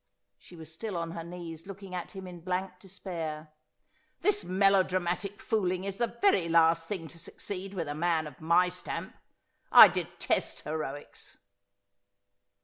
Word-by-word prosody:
She 180 - -15
was 160 -1 -11
still 200 +2 -4
on 165 -1 -3
her 165 -1 -6
knees, 170 0 -8
looking 195 -1 -9
at 180 +3 -5
him 190 -1 -7
in 180 -1 -9
blank 180 +1 -3
despair. 165 -5 -6 0.4
' - - -41
This 415 +2 +2
melo 195 +1 +4
dramatic 185 +2 -2
fooling 185 -4 0
is 195 +1 -5
the 235 - -1
very 195 - +3
last 165 0 +4
thing 175 -5 -4
to 170 - -13
succeed 195 +3 -6
with 170 -4 -2
a 145 - -3
man 160 0 +1
of 150 -2 -11
my 170 +3 +4
stamp. 180 0 -5 0.6
I - - +11
detest - - -2
heroics.' 150 -2 -6
180 Hz, 155 wpm, -30 LUFS, 165-190 Hz, 0.6 s, I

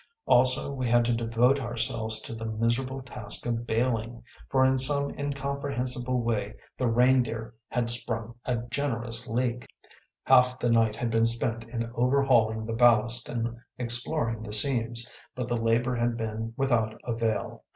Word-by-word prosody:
Also 130 +2 +3
we 130 -2 -2
had 120 0 +4
to 120 - +1
devote 115 +4 +2
ourselves 115 -3 -2
to 115 - -7
the 115 0 -7
miserable 120 +4 -1
task 130 - -5
of 120 0 -2
bailing, 115 0 -1 0.3
for 130 -1 +3
in 130 0 +3
some 140 +2 +1
incomprehensible 140 -3 -2
way 110 -2 -2 0.2
the 130 - -1
Reindeer 120 -1 +2
had 120 -1 -1
sprung 115 -1 -1
a 125 -2 0
generous 120 -4 0
leak. 120 +1 -2 0.6
Half 125 -1 +5
the 120 -2 0
night 115 -2 +3
had 115 +1 -2
been 115 0 +3
spent 115 0 -1
in 115 0 -4
overhauling 120 -4 +2
the 115 - -3
ballast 120 0 +3
and 115 -1 -3 0.2
exploring 120 0 0
the 105 -1 -6
seams, 120 0 0 0.3
but 125 -2 -3
the 120 - -1
labor 115 +2 +1
had 120 0 0
been 110 0 -4
without 115 -5 0
avail. 115 -2 -2
120 Hz, 150 wpm, -27 LUFS, 115-125 Hz, 0.6 s, Half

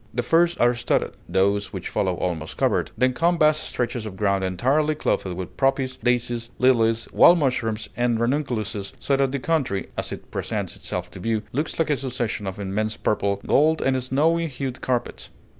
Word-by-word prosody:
The 120 - 0
first 170 +6 +3
are 120 +1 +4
studded, 120 0 0 0.2
those 100 +3 +1
which - - -5
follow 95 -1 0
almost 85 -3 -3
covered, - - +1
then 130 +2 +3
come 170 +5 +2
vast 155 -1 +3
stretches 120 -2 -3
of 100 - -8
ground 100 -1 +1
entirely 135 +12 +1
clothed 95 -9 -1
with 90 0 -7
poppies, 135 -1 +1
daisies, 120 0 0
lilies, 115 -3 +3
wild 175 - +7
mushrooms, 115 -7 -1
and 120 0 +1
ranunculuses, 115 -6 -1
so 140 - 0
that 135 -1 +1
the 140 - -1
country 135 -9 -1
(as - - -3
it - - -8
presents - - -3
itself - - -5
to - - -10
view) 110 -1 -1
looks 150 +5 -2
like 160 -2 +1
a 145 - +2
succession 120 -6 -3
of 95 +2 -5
immense 105 +2 -2
purple, 100 -1 0
gold, 155 +3 +3
and 130 -1 +1
snowy 160 +6 +1
hued 130 -2 -5
carpets. 125 -2 -2
120 Hz, 180 wpm, -24 LUFS, 105-140 Hz, 0.2 s, wild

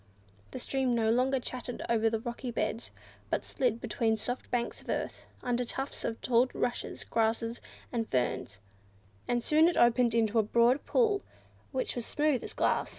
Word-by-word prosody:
The - - -7
stream 260 -1 0
no 220 -1 +2
longer 255 +3 +2
chattered 250 0 -5
over 225 -1 +3
rocky 240 +2 -5
beds, 225 0 -2 0.4
but - - -1
slid 245 -3 0
between 225 -2 0
soft 245 +4 -4
banks 240 -1 -2
of - - -15
earth, - - -3 0.2
under 245 0 +1
tufts 270 +3 -5
of 225 - -2
tall 245 +1 +4
rushes, 245 0 -2
grasses, 230 +1 0 0.3
and 230 -2 -2
ferns, 125 -5 -1 0.7
and 240 -1 +1
soon 310 +5 +5
it 345 - +1
opened 240 -1 +4
into 225 0 +3
a - - +7
broad 235 +5 +3
pool, 430 -5 +3 0.5
which 260 -2 -1
was 240 -2 -4
smooth 295 -5 +1
as - - -6
glass. - - +1
240 Hz, 165 wpm, -31 LUFS, 225-255 Hz, 0.7 s, a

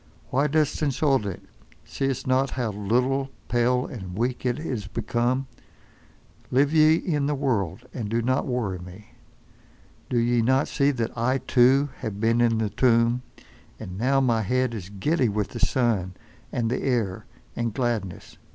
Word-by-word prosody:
Why 140 +3 +2
dost 150 0 +1
insult 135 -5 +1
it—see'st 135 +7 -5
not 130 +1 +2
how 120 -4 -1
little, 125 +7 0 0.2
pale 125 +1 +2
and 95 -6 -7
weak 125 +2 -1
it 120 - 0
is 125 -10 -4
become? 120 +4 -1 1.0
Live 140 +4 +2
ye 155 0 +6
in 150 -5 -1
the 150 - 0
world—and 115 - -2
do 115 +1 0
not 130 +4 0
worry 115 -8 -2
me. 90 +4 -12 1.0
Do 125 - 0
ye 120 0 +2
not 130 +4 +2
see 140 0 +2
that 120 -5 -2
I, 125 +3 +1
too, 130 +2 +3
have 105 -2 -5
been 115 +2 +2
in 115 -1 +3
the 110 -2 -1
tomb, 115 +1 +3 0.6
and 90 - -7
now 135 +4 +3
my 120 -4 +2
head 125 +3 0
is 100 -5 -6
giddy 125 - +1
with 105 -1 -1
the 120 - -7
sun, 115 -7 +1 0.4
and 115 -1 -1
the 125 - -1
air, 115 -8 -1 0.3
and 115 -1 -1
gladness. 110 -6 -3
120 Hz, 155 wpm, -25 LUFS, 110-135 Hz, 1.0 s, ye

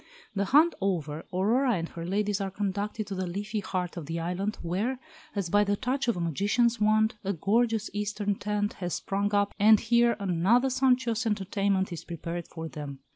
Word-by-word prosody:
The 200 -1 0
hunt 300 - +5
over, 160 -5 -2
Aurora 235 +8 +2
and 165 -2 -2
her 165 - -7
ladies 205 +1 0
are 195 - -1
conducted 205 +2 -3
to 200 - -6
the 185 -1 -2
leafy 205 +4 -3
heart 185 -2 -3
of 160 -4 -6
the 165 +1 -3
island, 180 +5 -2
where, 200 +10 -1 0.4
as 190 -4 -2
by 205 0 +5
the 205 0 +1
touch 260 +5 -1
of 235 - +1
a - - -3
magician's 205 - +1
wand, 215 +1 +3
a 200 +1 -1
gorgeous 220 +4 +1
Eastern 205 0 -1
tent 205 +1 -2
has 180 -1 -1
sprung 200 +1 -1
up, 205 0 +2
and 215 +1 +7
here 235 0 +3
another 200 +8 +2
sumptuous 250 -3 +2
entertainment 195 -2 0
is 165 - -7
prepared 170 0 -5
for 160 -1 -7
them. 145 -3 -7
200 Hz, 185 wpm, -28 LUFS, 180-220 Hz, 0.4 s, and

